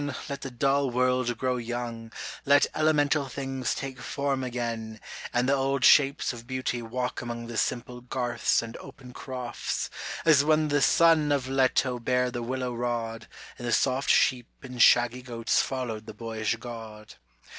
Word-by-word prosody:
let 140 Hz, -1 st, -5 dB
the 135 Hz, -, -5 dB
dull 135 Hz, +2 st, +1 dB
world 125 Hz, -1 st, +1 dB
grow 130 Hz, 0 st, 0 dB
young, 120 Hz, -1 st, -5 dB, 0.3 s
Let 145 Hz, 0 st, +5 dB
elemental 150 Hz, -2 st, +2 dB
things 135 Hz, -1 st, -3 dB
take 135 Hz, -2 st, -6 dB
form 140 Hz, 0 st, -2 dB
again, 115 Hz, -3 st, -4 dB, 0.3 s
And 120 Hz, +1 st, +1 dB
the 140 Hz, -, +3 dB
old 135 Hz, -1 st, +1 dB
shapes 140 Hz, -2 st, +5 dB
of 120 Hz, 0 st, -11 dB
Beauty 130 Hz, -2 st, -2 dB
walk 125 Hz, +2 st, -3 dB
among 120 Hz, -1 st, -5 dB
The 120 Hz, 0 st, -7 dB
simple 125 Hz, +2 st, -2 dB
garths 120 Hz, -1 st, 0 dB
and 115 Hz, 0 st, -8 dB
open 125 Hz, -2 st, -12 dB
crofts, 125 Hz, -2 st, -4 dB, 0.3 s
as 150 Hz, -3 st, +6 dB
when 155 Hz, 0 st, +2 dB
The 145 Hz, -1 st, +2 dB
son 160 Hz, -2 st, +4 dB
of 140 Hz, -3 st, 0 dB
Leto 130 Hz, -1 st, +1 dB
bare 125 Hz, +1 st, +1 dB
the 120 Hz, -1 st, -4 dB
willow 125 Hz, +1 st, -3 dB
rod, 115 Hz, -1 st, -3 dB, 0.3 s
And 120 Hz, -, -5 dB
the -, -, 0 dB
soft 130 Hz, +2 st, +1 dB
sheep 125 Hz, -2 st, +3 dB, 0.2 s
and 125 Hz, -2 st, -4 dB
shaggy 120 Hz, +1 st, +5 dB
goats 115 Hz, -2 st, 0 dB
followed 115 Hz, -5 st, -4 dB
the 110 Hz, -, -8 dB
boyish 110 Hz, -1 st, -2 dB
God. 115 Hz, -2 st, -9 dB
125 Hz, 160 wpm, -27 LUFS, 120-135 Hz, 0.3 s, as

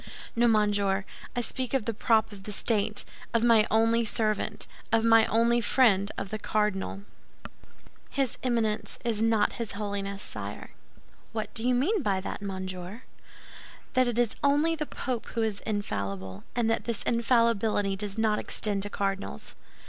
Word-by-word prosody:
"No, 240 Hz, +1 st, +4 dB
monsieur; 205 Hz, -3 st, +2 dB, 0.3 s
I 245 Hz, -, +1 dB
speak 255 Hz, +2 st, -3 dB
of 250 Hz, -6 st, 0 dB
the 230 Hz, -, -1 dB
prop 220 Hz, 0 st, +2 dB
of 200 Hz, -2 st, -10 dB
the 210 Hz, -, -5 dB
state, 210 Hz, 0 st, +1 dB, 0.3 s
of 230 Hz, -, +3 dB
my 230 Hz, -2 st, +5 dB
only 225 Hz, +2 st, +3 dB
servant, 215 Hz, -1 st, -1 dB, 0.3 s
of 225 Hz, 0 st, +3 dB
my 225 Hz, -1 st, +6 dB
only 235 Hz, +2 st, +3 dB
friend—of 200 Hz, -5 st, +2 dB
the 215 Hz, -, -3 dB
cardinal." 205 Hz, -2 st, -1 dB, 1.1 s
"His 270 Hz, -4 st, -1 dB
Eminence 230 Hz, -4 st, -1 dB
is 225 Hz, -2 st, +1 dB
not 225 Hz, -2 st, +3 dB
his 225 Hz, -, -4 dB
holiness, 200 Hz, -1 st, -4 dB
sire." -, -, -7 dB, 0.6 s
"What 215 Hz, -2 st, -4 dB
do 225 Hz, -, 0 dB
you 250 Hz, -, +3 dB
mean 355 Hz, -, +2 dB
by 200 Hz, -7 st, +1 dB
that, 190 Hz, -, -5 dB
monsieur?" 190 Hz, +2 st, -5 dB, 0.9 s
"That 255 Hz, -1 st, +3 dB
it 240 Hz, -1 st, -1 dB
is 240 Hz, -3 st, +1 dB
only 295 Hz, +4 st, +3 dB
the 305 Hz, -2 st, -3 dB
Pope 250 Hz, -4 st, -4 dB
who 230 Hz, -, +1 dB
is 215 Hz, -2 st, -1 dB
infallible, 100 Hz, -, -3 dB
and 240 Hz, -2 st, +1 dB
that -, -, -1 dB
this 235 Hz, -3 st, -2 dB
infallibility 230 Hz, -4 st, +2 dB
does 200 Hz, +1 st, -4 dB
not 220 Hz, -1 st, +2 dB
extend 205 Hz, -2 st, -1 dB
to 205 Hz, -, -4 dB
cardinals." 195 Hz, -, -3 dB
220 Hz, 155 wpm, -28 LUFS, 200-235 Hz, 1.1 s, my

